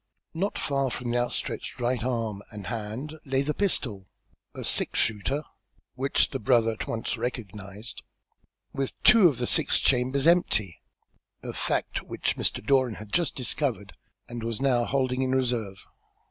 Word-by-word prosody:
Not 195 +5 -1
far 135 -2 0
from 120 0 -3
the 120 - +2
outstretched 120 0 -3
right 120 -1 0
arm 115 -5 -2
and 105 -3 -8
hand 115 +8 -5
lay 135 0 +1
the 150 +2 -1
pistol, 115 - 0 0.5
a - - -5
six - - 0
shooter, 110 +8 +1 0.5
which 135 +2 +1
the 135 - -3
brother 115 0 +3
at 110 - -5
once 115 - -2
recognised, 105 -2 -5 0.7
with 135 -1 -3
two 225 -6 +8
of 145 -7 0
the 125 - -1
six - - +3
chambers 130 +2 +2
empty, 105 - +3 0.6
a - - -5
fact - - -1
which - - -2
Mr. - - 0
Doran 130 -3 +3
had 105 -1 -11
just 170 -6 +2
discovered, 120 -6 -1 0.3
and 120 -1 -6
was 115 0 -2
now 125 -3 +2
holding 130 -1 0
in 130 0 +1
reserve. 120 -7 -1
125 Hz, 155 wpm, -27 LUFS, 110-135 Hz, 0.7 s, two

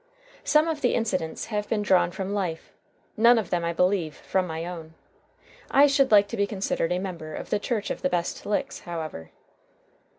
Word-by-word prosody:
Some 305 +1 +3
of 315 -3 -2
the - - +2
incidents 185 -8 -2
have 210 0 -2
been 210 -2 0
drawn 180 -4 +3
from 190 +3 -4
life; 180 -5 -3 0.4
none 235 +2 +6
of 215 -6 -2
them, 175 -1 0
I 170 - 0
believe, 180 -2 +1
from 185 -1 -1
my 160 0 -4
own. 165 -2 -8 0.7
I 280 +1 +6
should 275 -1 +3
like 205 -1 +6
to - - -5
be 200 0 +1
considered 190 -4 -1
a 180 - +1
member 170 -5 -5
of - - -7
the 210 - +2
Church 215 -1 -2
of - - -4
the 275 - +1
Best 175 -5 -2
Licks, 240 +7 -2
however. 160 - -6
190 Hz, 195 wpm, -26 LUFS, 170-215 Hz, 0.7 s, none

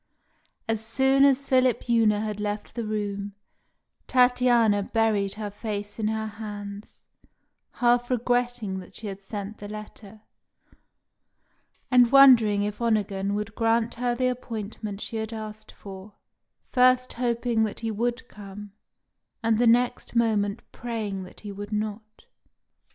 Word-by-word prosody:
As 225 -1 -1
soon 265 +4 +3
as 275 0 +3
Philipjewna 235 -4 +3
had 210 -1 -4
left 210 0 -4
the 230 -1 -4
room, 205 -1 -3 0.7
Tatiana 245 -4 +4
buried 205 -2 0
her 210 -1 -5
face 205 0 -5
in 215 - 0
her 220 0 -1
hands, 205 -1 -8 0.7
half 245 0 +2
regretting 245 -4 0
that 180 - -13
she 220 - -9
had 200 -1 -6
sent 205 +1 -6
the 205 - -7
letter, 210 0 -10 1.7
and 245 -1 +6
wondering 235 -7 +7
if 210 +2 -4
Onegin 205 -3 0
would 210 +1 -4
grant 225 +1 +1
her 245 0 -1
the 255 +1 0
appointment 215 -4 -5
she 225 - -5
had 220 +1 -4
asked 215 -1 -8
for, 195 +1 -11 0.6
first 255 0 +4
hoping 235 -1 0
that 215 - -6
he 225 -1 -2
would 240 +3 -2
come, 205 -1 -10 0.7
and 225 -1 +2
the 240 - +4
next 240 +1 +2
moment 215 -2 +1
praying 215 -5 -4
that 180 - -14
he 205 - -7
would 205 +1 -8
not. 215 - -5
220 Hz, 135 wpm, -26 LUFS, 205-240 Hz, 1.7 s, wondering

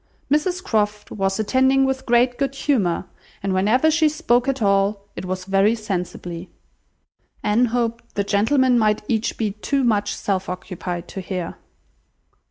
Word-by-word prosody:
Mrs 355 +5 +1
Croft 210 - -1
was 195 0 -1
attending 265 +4 +3
with 265 0 -2
great 245 +1 +3
good 275 -1 -1
humour, 220 - 0 0.4
and 195 -1 0
whenever 225 +11 +3
she 315 -1 +3
spoke 245 -4 +1
at 270 0 0
all, 200 -1 +1
it - - -6
was 185 0 -4
very 195 +3 +3
sensibly. 180 -4 -5 0.9
Anne 215 +4 +3
hoped 235 0 -2
the 200 - +1
gentlemen 240 +5 +3
might 215 -1 +2
each 225 -1 -1
be 215 -3 0
too 265 +7 -1
much 210 -4 +1
self 190 -2 -2
occupied 180 -1 -5
to 190 - -6
hear. 180 -2 -4
215 Hz, 150 wpm, -22 LUFS, 195-255 Hz, 0.9 s, attending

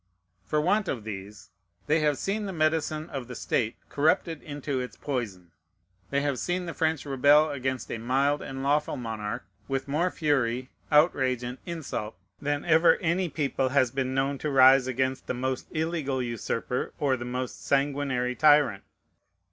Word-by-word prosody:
For 150 - +1
want 195 +6 +2
of 115 -5 -3
these, 105 -1 -8 0.3
they 155 +2 +3
have 150 -2 +2
seen 205 +1 -2
the - - -3
medicine 155 -1 0
of 135 -4 -5
the 125 - -7
state 115 0 -1
corrupted 160 +1 +1
into 145 -2 -4
its 125 0 -6
poison. 105 - -4 0.6
They 140 0 +1
have 140 -3 -1
seen 180 0 -1
the 170 - -5
French 160 -3 0
rebel 145 +3 +4
against 130 -2 -3
a 115 - -3
mild 135 +5 +1
and 135 -1 -6
lawful 145 +2 +1
monarch, 110 -3 -4 0.2
with 135 0 -2
more 160 +6 +1
fury, 130 -6 0 0.2
outrage, 135 -5 +3
and 125 +2 -5
insult 150 - -4 0.3
than 145 0 -1
ever 165 0 +5
any 170 +2 0
people 140 -3 -1
has 130 -2 +2
been 130 0 -2
known 135 +1 0
to 150 - -2
rise 130 -1 +6
against 130 +1 -1
the - - -2
most 130 +1 -2
illegal 155 -4 -1
usurper 120 0 -3
or 140 -3 +1
the 120 - -6
most 125 +1 -4
sanguinary 135 -3 0
tyrant. 145 -8 +4
135 Hz, 165 wpm, -27 LUFS, 125-155 Hz, 0.6 s, rise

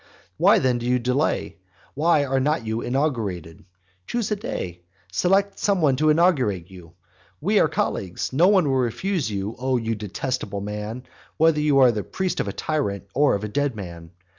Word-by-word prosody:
Why - - +5
then 125 -2 +1
do 120 - -4
you 125 0 +3
delay? 125 - -1 0.4
why 150 0 +2
are 135 0 0
not 145 -2 0
you 110 +1 -2
inaugurated? 110 - -2 0.4
Choose 235 -3 -2
a - - +2
day; 90 - -5 0.3
select 195 - +1
some 200 -2 +1
one 145 -5 +3
to 155 +2 +3
inaugurate 130 - +2
you; 85 -3 -13 0.5
we - - +2
are - - +4
colleagues; 95 +5 -2
no 165 +7 +5
one 190 -6 +4
will 135 -1 +1
refuse 130 - -1 0.3
O 130 0 +1
you 115 -1 -2
detestable 105 0 -4
man, 105 +4 -5 0.3
whether 160 -1 +4
you 150 -2 +3
are 130 -3 +6
the 105 -2 -3
priest 190 -1 -3
of - - -1
a - - -2
tyrant, 140 -11 -2
or 145 -3 +3
of 100 - -4
a - - -2
dead 140 +4 -1
man! 85 -5 -8
130 Hz, 180 wpm, -23 LUFS, 105-155 Hz, 0.5 s, are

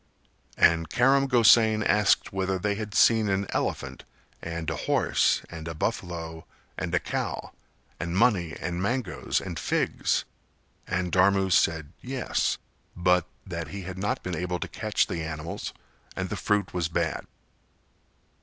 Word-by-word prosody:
And 80 -1 +4
Karam 135 +5 +4
Gosain 110 -3 +5
asked 105 -1 +3
whether 95 0 0
they 105 +2 0
had 105 0 -5
seen 110 -3 +5
an 100 0 +1
elephant - - -2 0.4
and 85 -1 -5
a - - -2
horse - - +2
and 80 -1 -8
a 80 - -5
buffalo 80 0 -4 0.3
and - - -2
a - - +3
cow - - -3 0.5
and 85 +1 -2
money 95 -8 +2
and 85 +1 -3
mangoes 110 -4 -1
and 85 -5 -5
figs - - 0 0.6
and 90 -1 -1
Dharmu 95 0 +3
said 80 -2 +2
"Yes," 130 0 -1 0.4
but 90 -1 +2 0.2
that 85 -4 -5
he 95 +6 -7
had 95 0 -7
not 105 +2 -1
been 90 -1 -3
able 90 +2 -2
to - - -2
catch 110 -1 0
the 85 - -4
animals 80 0 -5 0.4
and - - -3
the - - -3
fruit 105 -1 0
was 90 -3 0
bad. 85 -2 -2
90 Hz, 145 wpm, -27 LUFS, 85-105 Hz, 0.6 s, Gosain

